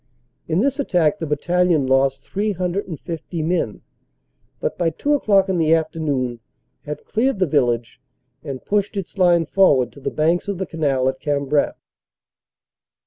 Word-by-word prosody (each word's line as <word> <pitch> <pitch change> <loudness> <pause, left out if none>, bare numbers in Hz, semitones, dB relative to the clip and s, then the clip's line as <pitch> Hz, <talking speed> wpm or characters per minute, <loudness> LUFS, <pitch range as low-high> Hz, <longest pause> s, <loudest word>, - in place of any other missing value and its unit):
In 165 +4 +1
this 275 +3 0
attack 175 - +1
the 165 - -3
bat 150 -1 -2
talion 175 -5 +2
lost 135 0 +2
350 180 -4 -3
men 165 -10 -1 0.8
but - - -2
by 170 -2 +1
two 285 - -1
o 290 - +3
clock 195 -4 +3
in 185 -2 0
the 160 0 +4
afternoon 145 -7 -2 0.5
had 150 0 -6
cleared 250 +2 0
the 185 - +2
village 120 -6 0 0.4
and 140 -4 -7
pushed 205 0 0
its 195 +1 -6
line 175 -2 +4
forward 145 -10 +3
to - - -14
the - - -2
banks 165 +4 +1
of 200 -2 -2
the 190 - -2
canal 140 -6 0
at 130 0 -1
Cambrai. 145 0 0
165 Hz, 155 wpm, -21 LUFS, 140-190 Hz, 0.8 s, the